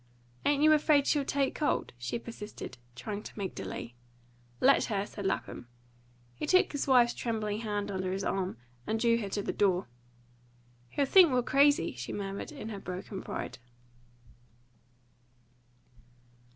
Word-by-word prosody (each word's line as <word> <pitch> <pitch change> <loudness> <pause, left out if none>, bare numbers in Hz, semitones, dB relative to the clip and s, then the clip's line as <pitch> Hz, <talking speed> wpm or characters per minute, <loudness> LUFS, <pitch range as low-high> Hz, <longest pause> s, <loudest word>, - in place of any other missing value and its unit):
"Ain't 290 0 +3
you 310 0 +7
afraid 300 -2 +4
she'll 290 -2 +2
take 275 0 0
cold," 300 - -1
she 125 - -2
persisted, 220 - -8 0.2
trying 210 +7 -5
to - - -11
make 195 -2 -3
delay. 115 - -6 0.7
"Let 275 +2 +5
her!" 205 -3 -1
said 205 -2 -5
Lapham. 155 - -3 0.7
He 120 - -5
took 370 - +4
his 285 -1 -2
wife's 245 -3 +5
trembling 215 -3 -2
hand 205 -2 -2
under 185 -1 -2
his 195 +1 -2
arm, 190 -7 -1 0.3
and 220 - 0
drew 230 0 +3
her 205 -3 -4
to 205 +1 -2
the - - -2
door. 190 -2 +2 1.0
"He'll 280 - +1
think 350 +2 +7
we're 250 -1 +2
crazy," 280 - +4
she 125 0 -6
murmured 200 +6 -4
in 275 -7 -7
her 205 -3 -5
broken 185 +1 -6
pride. - - -5
215 Hz, 150 wpm, -30 LUFS, 195-275 Hz, 1.0 s, you